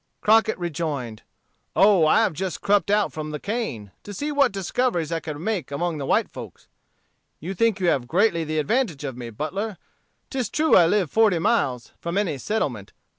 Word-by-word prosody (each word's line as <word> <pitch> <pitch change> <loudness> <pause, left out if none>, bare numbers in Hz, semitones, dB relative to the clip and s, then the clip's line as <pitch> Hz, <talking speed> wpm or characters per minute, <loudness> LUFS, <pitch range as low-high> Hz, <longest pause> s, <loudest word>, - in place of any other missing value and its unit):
Crockett 220 +1 +3
rejoined, 150 -10 -4 0.5
"Oh, 190 -2 +5
I - - +5
have - - 0
just 185 +3 -4
crept 200 -2 +2
out 205 0 +2
from 155 -1 -5
the 150 0 -5
cane, 200 - -4
to 205 - -9
see 295 +6 -3
what 280 -4 +3
discoveries 195 -3 -1
I 165 - 0
could 155 -2 -6
make 195 0 -2
among 160 +2 -2
the 135 - -4
white - - +2
folks. - - -11 0.7
You 180 +6 -5
think 225 +1 +1
you 185 - -1
have 125 -6 0
greatly 170 - +2
the 155 0 -3
advantage 165 - 0
of 135 -4 -4
me, 120 -1 -7
Butler. 190 - -4 0.5
'Tis 260 -4 -2
true 315 +1 +3
I 170 -3 +7
live 185 -4 +1
forty 220 -5 +4
miles 145 - 0
from 170 +3 -3
any 170 -9 -1
settlement. 130 - -3
175 Hz, 185 wpm, -24 LUFS, 150-210 Hz, 0.7 s, I